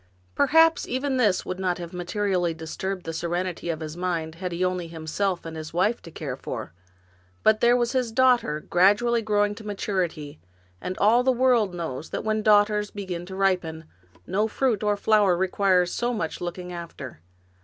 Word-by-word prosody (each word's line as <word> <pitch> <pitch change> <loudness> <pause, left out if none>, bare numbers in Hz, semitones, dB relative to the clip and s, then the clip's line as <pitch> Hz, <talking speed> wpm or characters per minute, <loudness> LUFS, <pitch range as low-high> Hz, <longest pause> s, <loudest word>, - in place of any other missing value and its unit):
Perhaps 325 +3 +4
even 260 +1 -1
this 210 -7 +2
would 185 0 -4
not 185 -2 0
have 170 -1 -8
i/ 180 0 -4 0.2
nally 175 -4 +1
disturbed 180 +4 -5
the 165 - -4
serenity 175 +1 -3
of 160 -1 -3
his 155 0 -6
mind 170 -3 -2
had 180 +2 -5
he 170 +1 -4
had - - +4
only 180 -2 -2
himself 170 +3 -2
and 165 -1 -6
his 155 0 -7
wife 205 +6 +1
to 170 - -11
care 150 -5 -5
for; 110 -9 -6 0.7
but 215 0 +4
there 240 +1 +5
was 240 -1 0
his 255 -3 0
daughter 245 - +3
gradually 205 +8 +3
growing 205 -1 +1
to 215 +1 -11
maturity, 180 -8 -3 0.4
and 185 - -4
all 225 +4 +4
the 260 +1 +3
world 240 -7 +2
knows 160 -3 -5
that - - -4
when 215 0 0
daughters 210 0 +3
be 205 -1 -7
gin 175 -1 -5
to 190 - -7
ripen, 180 -4 0 0.4
no 210 +3 0
fruit 230 -2 0
nor 210 -1 +1
flower 205 -4 +3
requires 185 -1 +2
so 240 0 -1
much 165 -7 -4
looking 180 +1 -5
after. 165 - -8
185 Hz, 185 wpm, -25 LUFS, 170-215 Hz, 0.7 s, there